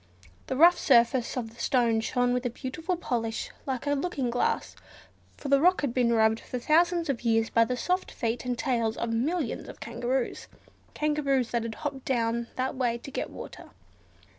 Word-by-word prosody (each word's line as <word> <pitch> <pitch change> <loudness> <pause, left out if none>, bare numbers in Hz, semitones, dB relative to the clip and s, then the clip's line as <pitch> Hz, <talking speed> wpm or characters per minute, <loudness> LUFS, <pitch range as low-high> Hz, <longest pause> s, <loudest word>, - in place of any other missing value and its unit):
The - - -2
rough 345 +4 +7
surface 240 -1 +3
of 225 -2 -4
the 235 - -10
stone 235 -4 +2
shone 245 +2 +1
with 250 0 0
a - - -2
beautiful 305 +9 -4
polish 230 -8 -3 0.2
like 260 -1 -2
a 285 - 0
looking 275 -4 -1
glass, 245 - -1 0.6
for - - -7
the 275 0 +4
rock 360 +3 +4
had 280 -5 -1
been 245 -2 +2
rubbed 220 -1 +3
for 250 - -6
thousands 335 +6 +2
of 275 -5 -1
years 225 -1 +1
by 230 0 +4
the 250 +2 -2
soft 365 +9 -1
feet 230 -1 -2
and 250 -1 -2
tails 230 -3 0
of 235 -1 -2
millions 280 +3 -1
of - - -11
kangaroos: 240 +2 -2 0.5
kangaroos 280 -5 +1
that 235 - +1
had 225 -1 -5
hopped 280 -4 -5
down 235 -2 0
that 260 +1 -1
way 245 -3 0
to 260 +3 -10
get - - -3
water. - - -10
250 Hz, 190 wpm, -28 LUFS, 235-280 Hz, 0.6 s, rough